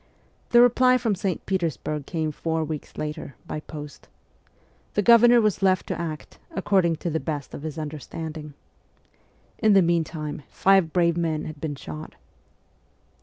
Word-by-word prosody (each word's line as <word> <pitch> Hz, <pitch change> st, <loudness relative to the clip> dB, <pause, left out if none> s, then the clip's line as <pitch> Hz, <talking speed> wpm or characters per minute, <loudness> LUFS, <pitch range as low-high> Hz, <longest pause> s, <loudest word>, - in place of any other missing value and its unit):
The 240 Hz, 0 st, +7 dB
reply 255 Hz, +1 st, +5 dB
from 230 Hz, -4 st, 0 dB
St. 185 Hz, -2 st, -3 dB
Petersburg 155 Hz, -5 st, -2 dB
came 160 Hz, -2 st, -2 dB
four 160 Hz, +2 st, -2 dB
weeks 155 Hz, -1 st, -6 dB
later, 150 Hz, -2 st, -5 dB
by -, -, -4 dB
post: 150 Hz, -1 st, -10 dB, 0.9 s
the 205 Hz, -, +2 dB
Governor 235 Hz, +2 st, +7 dB
was 215 Hz, -4 st, +1 dB
left 185 Hz, -1 st, +3 dB
to -, -, -2 dB
act 155 Hz, -2 st, -6 dB
' -, -, -34 dB
according 190 Hz, -4 st, +2 dB
to 170 Hz, +2 st, -4 dB
the 160 Hz, -, 0 dB
best 150 Hz, -4 st, -5 dB
of -, -, -7 dB
his 155 Hz, 0 st, -6 dB
understanding.' 155 Hz, 0 st, -6 dB, 1.0 s
In 215 Hz, -2 st, +4 dB
the 195 Hz, -2 st, +6 dB
meantime 160 Hz, -3 st, -1 dB
five 190 Hz, -4 st, +3 dB
brave 170 Hz, -1 st, +2 dB
men 160 Hz, -3 st, -1 dB
had 155 Hz, -2 st, -8 dB
been 150 Hz, -3 st, -3 dB
shot. 80 Hz, -, -8 dB
165 Hz, 155 wpm, -25 LUFS, 155-195 Hz, 1.0 s, The